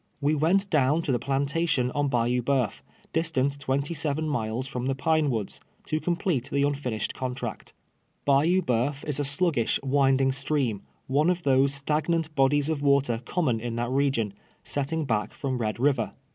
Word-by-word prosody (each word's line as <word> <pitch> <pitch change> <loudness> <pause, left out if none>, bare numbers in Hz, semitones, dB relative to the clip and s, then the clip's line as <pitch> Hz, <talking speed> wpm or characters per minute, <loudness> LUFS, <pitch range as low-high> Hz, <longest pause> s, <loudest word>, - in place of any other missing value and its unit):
AVe 145 +2 +3
went 175 +7 +2
down 150 +2 +3
to 140 - -1
the 120 - +1
i>lantation 140 -1 0
on 145 -1 +1
Bayou 125 -1 +1
Boeuf, 125 -4 0 0.3
distant 145 -4 0
twenty 140 +3 -1
seven 155 0 -1
miles 120 -3 -2
from 125 -1 -4
the 135 - 0
Pine 155 +2 +2
AVoods, 110 -6 -3 0.3
to 155 - -1
complete 170 -6 -1
the 140 0 +1
nntinished 140 -6 -1
contract. 125 -3 -5 0.5
Bayou 155 +7 +3
B(,euf 125 +5 -1
is 145 -1 -1
a - - +1
sluggish, 140 -4 +1
winding 135 -1 +3
stream 135 -6 -1 0.2
— - - -41
one 145 +5 +2
of 180 -1 0
those 135 0 +3
stagnant 155 +3 -1
bodies 140 +1 +3
of 155 -3 -1
water 140 -5 +2
common 130 -8 0
in 115 0 -4
that 120 +1 -2
region, 130 -6 +1 0.3
setting 150 +3 -2
back 110 -5 -1
from 135 -4 -2
Red 110 -1 -2
River. 130 -4 +1
140 Hz, 170 wpm, -26 LUFS, 125-150 Hz, 0.5 s, AVe